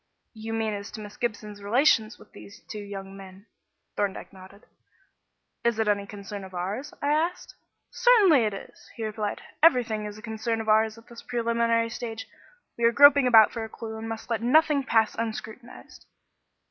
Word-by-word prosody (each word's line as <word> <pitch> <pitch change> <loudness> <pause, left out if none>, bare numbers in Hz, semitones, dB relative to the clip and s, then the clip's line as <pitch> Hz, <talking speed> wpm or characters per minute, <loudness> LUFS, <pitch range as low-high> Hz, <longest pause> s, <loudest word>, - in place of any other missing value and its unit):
"You 225 0 -7
mean 220 -1 -1
as 200 0 -6
to 220 - -7
Miss 205 -1 -10
Gibson's 215 -3 -5
relations 225 +1 +2
with - - -18
these 205 +3 -14
two 215 - -7
young 195 -1 -8
men?" 195 0 -13 0.5
Thorndyke 200 -1 -3
nodded. 190 +2 -15 1.0
"Is 235 -2 +1
it 220 -1 0
any 200 -1 0
concern 200 0 -8
of 190 -1 -11
ours?" 200 +11 -4
I 285 - +1
asked. 335 +4 -2 0.4
"Certainly 410 - +5
it 210 - -1
is," - - -12
he 225 - -4
replied. 215 -1 -4 0.2
"Everything 240 -9 +3
is 210 0 -7
a 215 - -13
concern 220 0 -3
of 220 - -5
ours 220 +1 +3
at 230 - -16
this 235 -1 -12
preliminary 230 -1 0
stage. 225 -2 -6 0.5
We 235 - +2
are 230 - +5
groping 285 +1 +7
about 225 -3 +7
for 230 - -5
a 220 - -7
clue 220 0 -8
and 220 +1 -6
must 225 -1 -6
let 225 -2 0
nothing 290 +3 +3
pass 225 -3 +2
unscrutinised." 230 +2 -7
220 Hz, 180 wpm, -26 LUFS, 210-235 Hz, 1.0 s, groping